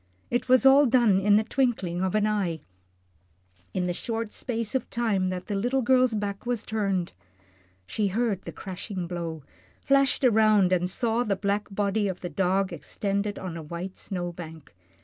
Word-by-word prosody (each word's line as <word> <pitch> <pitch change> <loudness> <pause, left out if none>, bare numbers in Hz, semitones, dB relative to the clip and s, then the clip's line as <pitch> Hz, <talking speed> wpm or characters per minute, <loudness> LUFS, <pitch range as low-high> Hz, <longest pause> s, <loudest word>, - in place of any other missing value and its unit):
It 245 +1 -1
was 255 +1 +5
all 275 +1 +7
done 235 -6 +4
in 205 +1 +4
the 215 - +4
twinkling 220 -8 0
of 190 +1 0
an 215 0 +3
eye 195 -7 -1 1.1
in 180 - -1
the 175 - -1
short 225 +3 -4
space 230 -3 -4
of 260 -3 -1
time 205 -6 0
that 185 0 -4
the 210 - -4
little 245 +6 0
girl's 255 -1 +3
back 200 -1 -3
was 240 -2 -2
turned. 195 -5 -1 0.7
She 210 - -1
heard 205 -1 0
the - - -8
crashing 190 0 -6
blow, 170 -3 -5 0.4
flashed 275 -1 +2
around, 215 -5 +4
and 180 0 +1
saw 235 +4 0
the 205 -4 0
black 200 +1 -1
body 205 +1 0
of 185 -2 -4
the 175 - -4
dog 190 +3 0
extended 200 +5 -3
on 180 -3 -6
a 165 - -5
white 170 +4 -6
snow 175 -2 -4
bank. 160 -3 -10
200 Hz, 175 wpm, -26 LUFS, 185-230 Hz, 1.1 s, all